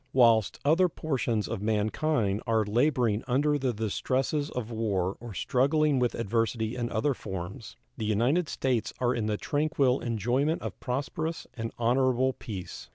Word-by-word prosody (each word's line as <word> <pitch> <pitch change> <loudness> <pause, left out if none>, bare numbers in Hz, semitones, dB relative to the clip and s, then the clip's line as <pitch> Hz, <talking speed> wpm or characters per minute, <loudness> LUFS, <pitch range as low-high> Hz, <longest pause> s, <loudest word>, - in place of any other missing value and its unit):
Whilst 115 -5 +4
other 170 +5 +4
portions 125 -9 -1
of 115 -4 -4
mankind 110 +1 0
are 110 -1 +2
laboring 120 -1 +2
under 145 +4 +2
the 130 -2 +1
distresses 130 +7 -1
of 120 -2 -5
war 100 -5 -1
or 115 -4 -8
struggling 140 - +2
with 125 -1 +1
adversity 115 +1 -1
in 120 -1 -2
other 135 +6 +1
forms, 100 +2 -7 0.2
the 110 - -3
United 125 - +2
States 125 -4 0
are 125 0 +2
in 110 -3 -1
the 105 -1 0
tranquil 145 -2 +1
enjoyment 120 - 0
of - - -6
prosperous 140 +5 -3
and 115 -2 -4
honorable 130 +2 +2
peace. 100 -8 -8
120 Hz, 150 wpm, -28 LUFS, 110-135 Hz, 0.2 s, Whilst